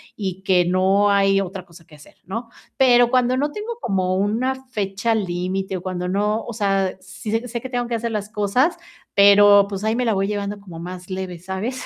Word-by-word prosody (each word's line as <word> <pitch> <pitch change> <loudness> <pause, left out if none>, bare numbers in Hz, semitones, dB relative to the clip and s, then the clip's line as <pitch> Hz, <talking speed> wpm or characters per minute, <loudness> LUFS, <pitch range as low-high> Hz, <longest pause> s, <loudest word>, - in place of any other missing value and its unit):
y 190 -2 -5
que 180 -2 +3
no 190 +3 +3
hay 195 0 +3
otra 190 -1 -6
cosa 170 -1 -17
que 150 - -16
hacer, 150 - -17
¿no? 230 +5 -5 0.3
Pero 245 -2 +5
cuando 255 0 +2
no 290 +2 0
tengo 455 +5 -6
como 185 -2 0
una 220 +7 0
fecha 210 0 -1
límite 190 0 -2
o - - -8
cuando 180 -1 -4
no 210 +3 0
o 235 - -6
sea, 195 -3 0
sí 190 +3 -8
sé 230 +2 -1
sé 235 +1 -4
que 260 - -8
tengo 245 -1 -2
que 235 - -2
hacer 230 0 -3
las 210 -1 -3
cosas, 215 - +1 0.4
pero 200 0 +7
pues, 200 0 -5
ahí 220 +1 +1
me 250 0 0
la 225 - +2
voy 195 0 0
llevando 205 0 -3
como 180 -5 -11
más 180 +1 -8
leve, 185 -2 -5
¿sabes? 190 +8 -4
200 Hz, 215 wpm, -21 LUFS, 190-230 Hz, 0.4 s, pero